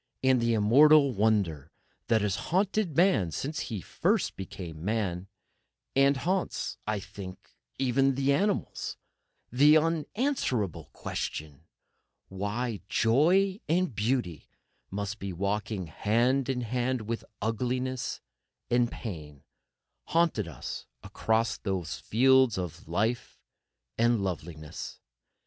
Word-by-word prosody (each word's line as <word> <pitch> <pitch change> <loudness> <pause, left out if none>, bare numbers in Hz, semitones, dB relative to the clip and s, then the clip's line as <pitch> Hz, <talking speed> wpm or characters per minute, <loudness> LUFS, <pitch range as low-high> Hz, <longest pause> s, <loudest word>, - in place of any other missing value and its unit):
And 130 -2 +4
the 115 0 +2
immortal 140 +6 +6
wonder 100 - +1 0.4
that 115 -2 +3
has 100 -2 +1
haunted 190 -2 +1
man 175 - +4
since 145 - -3 0.2
first - - +1
he - - -25
became 85 -4 -7
man, 95 -3 -1 0.7
and 135 +1 +4
haunts, 185 +6 -2
I 105 -1 0
think, 95 -1 -10 0.3
even 135 +1 +2
the 140 +1 +2
animals—the 150 - +1
unanswerable 155 - -1
question,—why 100 - -6
joy 180 - +3
and 180 -2 +2
beauty 105 - -1 0.4
must 100 +2 -4
ever - - -36
be 100 -1 -4
walking 100 +1 -2
hand 120 - +1
in 125 -2 0
hand 125 +1 -1
with 115 +2 -4 0.2
ugliness 125 +4 -2 0.5
and 120 0 +3
pain 75 - -7 0.6
haunted 165 - +1
us 75 -7 -7 0.2
across 110 0 0
those 95 -5 -3
fields 130 0 +4
of 85 -3 -5
life 110 +8 -1 0.6
and 115 -3 +3
loveliness. 80 -4 -5
115 Hz, 105 wpm, -29 LUFS, 95-135 Hz, 0.7 s, immortal